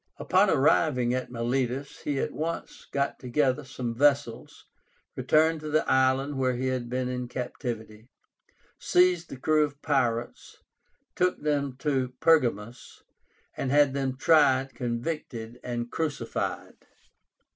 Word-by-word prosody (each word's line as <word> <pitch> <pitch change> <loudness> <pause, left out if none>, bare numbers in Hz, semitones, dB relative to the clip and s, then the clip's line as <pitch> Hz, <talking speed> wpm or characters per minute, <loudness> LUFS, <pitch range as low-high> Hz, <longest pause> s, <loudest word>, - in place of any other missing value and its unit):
Upon - - +3
arriving 130 -3 +3
at 130 0 -3
Milétus 125 +3 -2
he 145 -2 -2
at - - -2
once 165 +2 -5
got 140 0 -1
together 130 +2 0
some 125 -3 -5
vessels, 140 -2 0 0.5
returned 160 +1 +2
to 155 0 -6
the 155 +1 +1
island 130 +2 +2
where 130 -1 +1
he 130 +2 -1
had 125 -2 -3
been 125 0 -1
in 125 -1 -3
captivity, 120 -3 -6 0.7
seized 180 -1 +2
the 135 - -8
crew 155 +3 +2
of 145 -1 -4
pirates, 120 -5 -1 0.6
took 180 0 +1
them 140 -3 0
to 130 -4 -1
Pergamus, 120 -8 +1 0.5
and 135 - -3
had 145 0 +4
them 135 -2 -2
tried, 135 -4 +3
convicted, 120 -2 -4
and 120 -1 -4
crucified. 155 -3 -3
130 Hz, 125 wpm, -27 LUFS, 125-145 Hz, 0.7 s, had